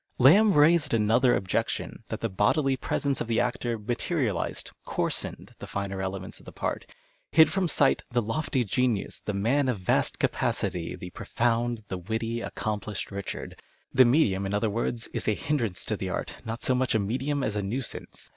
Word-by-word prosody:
Lamb 195 - +6
raised 150 -2 +5
another 115 +4 +4
objection, 95 - -2
that - - -5
the 115 - +1
bodily 130 - +2
presence 140 +1 -1
of - - -2
the 115 0 +1
actor 120 -1 -1
materialized, 120 - -2
coarsened, - - -3
the - - -7
finer 100 -1 -3
elements 95 0 -5
of - - -18
the - - -7
part - - -3 0.2
— - - -40
hid 160 -1 +6
from 190 -2 +1
sight 145 -3 +3
" - - -45
the 120 - +2
lofty 130 +4 0
genius, 115 0 0
the 105 - -4
man 130 +7 +2
of 115 -6 -1
vast 90 - +1
capacity, 85 -2 -1
the 90 - -8
profound, 120 +1 -1
the 95 - -4
witty, 115 +5 -2
accomplished 105 -3 -4
Richard." 100 -1 -6 0.3
The 130 - +8
medium, 110 -8 +3
in 100 - -1
other 105 +1 +1
words, 115 +1 -2
is - - -4
a 110 - +3
hindrance 120 -11 -1
to - - -1
the - - -4
art, - - -4
not 115 +1 -5
so 130 - +3
much 125 -2 +1
a - - +4
medium 130 +7 -1
as 110 -4 -1
a 105 - 0
nuisance. 115 +6 -5
115 Hz, 185 wpm, -27 LUFS, 105-130 Hz, 0.3 s, The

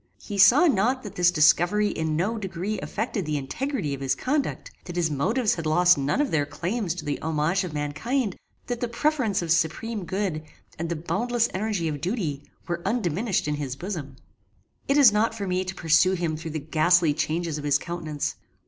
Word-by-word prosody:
He 205 -2 -6
saw 265 - +7
not 255 - +2
that 210 - -7
this 175 -1 +4
discovery 175 +6 +4
in 160 -3 -2
no 210 +8 -1
degree 195 +1 -3
affected 215 -1 -3
the 155 -2 -2
integrity 155 - -3
of 135 - -6
his 135 -1 +1
conduct; 280 +2 -2
that 175 - -7
his 170 -3 +1
motives 215 - +1
had 165 -2 -4
lost 175 +3 +5
none 140 - -1
of 295 - +1
their 150 -2 +2
claims 175 +5 -2
to 165 -4 -7
the 145 -1 -3
homage 160 +4 0
of 180 - -5
mankind; 180 - -2 0.3
that 245 -1 -3
the 245 - -1
preference 235 - 0
of 165 - -2
supreme 180 +6 0
good, 190 -4 -2 0.4
and 165 0 -3
the 170 - -1
boundless 235 +8 0
energy 195 -3 -1
of 145 -3 -4
duty, 175 - -2 0.3
were 170 -1 -2
undiminished 200 -3 0
in 150 - 0
his 135 -3 -4
bosom. 155 -6 -6 0.7
It 275 - +3
is 275 -7 +8
not 220 +2 +1
for 205 -3 -4
me 185 0 0
to 185 0 -6
pursue 165 +2 +3
him 170 -4 -1
through 160 +1 -6
the 155 0 -3
ghastly 160 +2 +3
changes 160 +1 -2
of - - -8
his 145 -1 +3
countenance. 160 -2 -4
175 Hz, 195 wpm, -25 LUFS, 155-215 Hz, 0.7 s, is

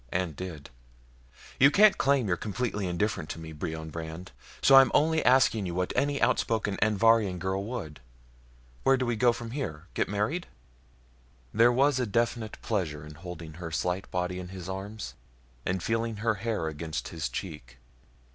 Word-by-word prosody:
And 90 -4 -1
did. 80 -4 -7 0.9
You 140 - +8
can't 205 +7 +6
claim 135 -4 +2
you're 90 - +2
completely 105 -1 -3
indifferent 90 -2 -1
to 80 - -5
me, 80 -1 -8
Brion 80 +1 -5
Brandd. 80 0 -7 0.3
So 135 - +6
I'm 135 -2 +8
only 160 +2 +3
asking 125 -6 +4
you 85 - -4
what 90 0 -1
any 140 0 +1
outspoken 110 -4 +1
Anvharian 110 -2 +3
girl 95 +2 -2
would. 100 - -6 0.8
Where 135 - +4
do 130 - -1
we 120 -1 0
go 120 +2 +4
from 115 -1 -6
here? 90 - -4
Get - - 0
married?" 105 - -1 1.1
There 115 +3 +5
was 135 +2 +3
a 125 - 0
definite 115 0 -1
pleasure 80 -9 -2
in 75 - -10
holding 85 -1 -9
her 85 - -4
slight 90 +3 -2
body 90 0 -2
in 90 - -6
his 95 -1 -8
arms 100 +3 -6 0.5
and 90 -1 -1
feeling 115 0 -1
her 115 +2 +1
hair 105 -4 -2
against 80 -3 -4
his 80 -2 -3
cheek. 75 -9 -7
100 Hz, 165 wpm, -28 LUFS, 85-115 Hz, 1.1 s, You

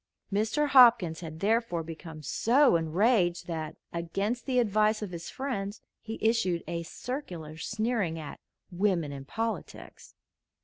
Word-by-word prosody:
Mr. 220 +9 +1
Hopkins 230 - +6
had 160 -2 -8
therefore 210 -5 +1
become 160 -1 -9
so 250 - +4
enraged 175 +3 +2
that, 160 -3 -4 0.2
against 195 +9 -2
the 255 -2 +1
advice 215 -1 +2
of 200 - -5
his 170 -1 -6
friends, 220 -7 -4 0.2
he 225 0 -6
issued 220 -7 +2
a 170 0 -3
circular 175 - -6
sneering 215 0 -1
at 150 -3 -8 0.3
"Women 175 -5 +1
in 135 -1 -7
Politics." 225 +7 -5
195 Hz, 130 wpm, -29 LUFS, 165-230 Hz, 0.3 s, Hopkins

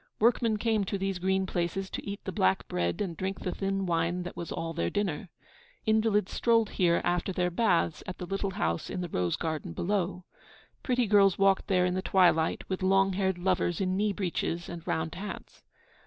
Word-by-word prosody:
Workmen 230 -1 +3
came 220 -1 +1
to 200 - -2
these 195 -1 -2
green 190 +1 +1
places 185 +1 -2
to - - -5
eat 200 0 -6
the 190 - -3
black 95 - +1
bread 85 - -1
and 180 -5 -2
drink 190 +4 -4
the 180 - -2
thin 195 0 -2
wine 170 +1 0
that 180 - -7
was 170 - -6
all 165 0 -3
their 170 - -1
dinner. 195 -3 -2 0.6
Invalids 220 -2 +2
strolled 230 -2 +2
here 170 -3 +2
after 175 +2 0
their 180 -1 0
baths 175 -5 +1
at 185 - -5
the 180 - -5
little 195 +2 -2
house 205 - -1
in 180 - -3
the 175 - -4
rose 90 - 0
garden 155 - -3
below. 180 - -1 0.6
Pretty 250 -2 +1
girls 200 -3 +5
walked 195 -1 +3
there 180 -2 +3
in 180 - 0
the 185 - -1
twilight 175 -4 +3
with 190 0 -3
long 195 +1 +3
haired 190 -1 0
lovers 175 -1 0
in 185 -1 0
knee 210 +2 +1
breeches 175 -3 -2
and 170 -1 -8
round 160 0 -1
hats. 195 +3 -8
185 Hz, 200 wpm, -29 LUFS, 175-200 Hz, 0.6 s, girls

